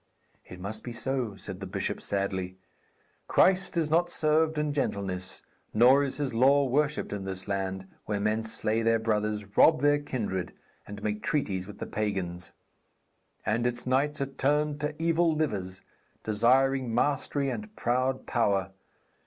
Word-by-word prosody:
'It 90 - -10
must 105 +4 -5
be 120 - -6
so,' 125 -3 -2
said 95 -1 -7
the 95 - -6
bishop 95 - -3
sadly. 95 -2 -2 0.7
'Christ 190 -1 +3
is 155 -2 +1
not 175 +2 +3
served 155 -1 +2
in 150 -1 0
gentleness, 95 -9 -2 0.3
nor 130 +5 +6
is 135 - -2
His 145 -4 -2
law 135 +4 +5
worshipped 145 +1 0
in 100 -1 -4
this 95 0 -5
land, 95 -1 -2 0.2
where 105 -1 -1
men 105 +2 +1
slay 110 0 0
their 115 0 +3
brothers, 105 -2 -1
rob 155 -2 +6
their 145 0 +4
kindred, 105 -10 -3 0.3
and 105 0 -8
make 105 0 -2
treaties 95 -11 -1
with 105 - -10
the - - -5
pagans. 95 -5 -3 0.9
And 115 +3 +1
its 120 -1 -3
knights 140 +4 +1
are 140 - 0
turned 145 +2 0
to 150 +1 -3
evil 165 0 +2
livers, 100 -11 -2 0.4
desiring 125 +3 +2
mastery 140 -1 0
and 215 +8 -7
proud 130 +2 0
power. 100 -5 +1
120 Hz, 155 wpm, -28 LUFS, 100-145 Hz, 0.9 s, nor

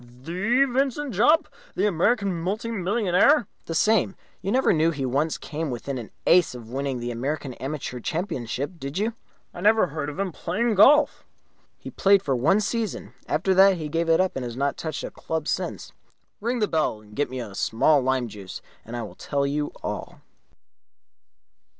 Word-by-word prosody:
"The 205 - +2
Vincent 270 +1 -1
Jopp? 270 - +4 0.3
The - - +1
American 200 +1 +1
multi 210 +6 -2
millionaire?" 205 - +3 0.2
"The 165 - -3
same. 205 +2 +3 0.3
You 195 - -2
never 260 -1 +3
knew 160 0 +3
he 145 -5 -2
once 140 +5 0
came 155 0 -4
within 130 +2 -4
an 115 - -8 0.2
ace 175 -6 +4
of 115 -2 -10
winning 135 -1 -2
the 120 0 -3
American 135 +3 -3
Amateur 135 -1 -5
Championship, 145 - -3
did 140 +3 -5
you?" 220 +3 0 0.4
"I 175 - -8
never 215 +2 +5
heard 155 -3 -4
of 145 - -8
his 195 -1 -1
playing 220 +10 -1
golf." 290 +9 +5 0.5
"He - - -9
played 195 0 +4
for 135 -6 0
one 165 - +3
season. 220 -1 -3
After 180 +5 +1
that 190 0 +6
he 155 -2 -5
gave 165 +2 -1
it 165 - +5
up 185 0 +1
and 130 - -3
has 120 -1 -6
not 140 +1 0
touched 160 -2 -5
a - - -5
club 160 -1 -4
since. - - -3 0.5
Ring 235 +4 -1
the 215 -3 +1
bell 155 - 0
and 105 0 -16
get 145 -2 0
me 130 0 -5
a 110 -5 -6
small 135 +9 +3
lime 130 -1 0
juice, 100 -4 -8 0.2
and 120 +2 -7
I 120 - -3
will 105 - -8
tell 140 -1 -2
you 145 +1 -1
all." - - -5
165 Hz, 185 wpm, -25 LUFS, 135-200 Hz, 0.5 s, that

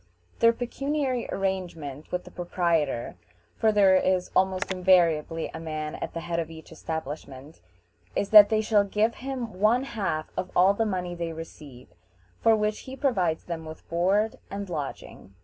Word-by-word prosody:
Their 230 - +6
pecuniary 260 +1 -2
arrangement 170 -7 -4
with 180 0 -2
the - - -13
proprietor, 165 - -1 0.4
for 220 - +3
there 200 -3 +5
is 185 -1 +1
almost 190 0 +1
invariably 170 -3 +2
a - - -6
man 155 -1 -4
at - - -6
the 165 - -3
head 170 0 -2
of 165 -1 -3
each 160 -1 -12
establishment, 145 -2 -7 0.5
is 200 - -1
that 210 -1 +10
they 220 -1 +2
shall 210 -1 +3
give 210 +3 +1
him 250 -7 -6
one 225 +5 +3
half 195 -11 -3
of 185 - -3
all 185 +2 +6
the 225 +2 0
money 180 -3 -2
they 170 -1 -4
receive, 150 -5 -11 0.5
for 225 - +5
which 210 0 -1
he 265 - -6
provides 190 - 0
them 165 -2 -5
with 155 0 -10
board 195 +6 +1
and 200 -1 -6
lodging. 140 - -6
185 Hz, 165 wpm, -26 LUFS, 160-215 Hz, 0.5 s, that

